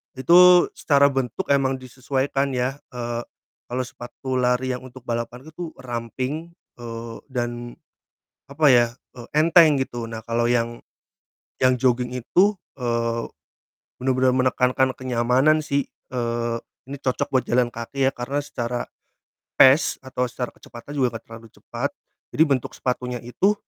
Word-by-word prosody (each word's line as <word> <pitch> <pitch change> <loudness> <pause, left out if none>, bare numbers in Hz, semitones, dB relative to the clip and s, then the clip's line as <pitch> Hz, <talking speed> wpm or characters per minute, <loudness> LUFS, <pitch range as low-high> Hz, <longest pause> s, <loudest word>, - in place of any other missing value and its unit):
Itu 175 +6 +7
secara 140 -1 +4
bentuk 135 - -3
emang 135 -1 +3
disesuaikan 135 +2 -2
ya, 125 +2 -1 0.2
eee, 120 -1 -3 0.5
kalau 125 +1 -2
sepatu 125 +1 -6
lari 125 +1 +1
yang - - -13
untuk 130 +1 -13
balapan 120 +1 -4
itu 160 +2 -8
ramping, 130 +6 -4 0.3
eee, 115 -1 -7
dan 120 -2 -4 0.7
apa 145 +1 +3
ya, 120 -2 +6 0.3
eee, 120 -1 -9
enteng 155 -2 +5
gitu, 120 -3 -4
nah 115 0 -7
kalau 115 +1 0
yang 120 -1 +1 0.9
yang 130 -1 +4
jogging 125 -1 +1
itu, 175 - +2 0.2
eee, 115 -2 -1 0.7
bener-bener 130 0 +2
menekankan 130 0 +2
kenyamanan 130 +4 +2
sih, 140 -1 -1 0.3
eee, 120 -1 -1 0.3
ini 140 +2 -7
cocok 130 +1 -1
buat 130 -2 +3
jalan 120 0 +2
kaki 130 +4 -2
ya 135 - +3
karena 125 +4 -3
secara 120 -2 -3 0.7
pace 135 +3 +5
atau 130 -1 -2
secara 125 0 -4
kecepatan 120 +5 -11
juga 125 -3 +1
enggak 115 - -7
terlalu 115 0 -11
cepat. - - -4 0.4
Jadi 155 - +5
bentuk 135 -3 -1
sepatunya 125 -1 -3
itu 185 - +1
125 Hz, 135 wpm, -23 LUFS, 120-135 Hz, 0.9 s, Itu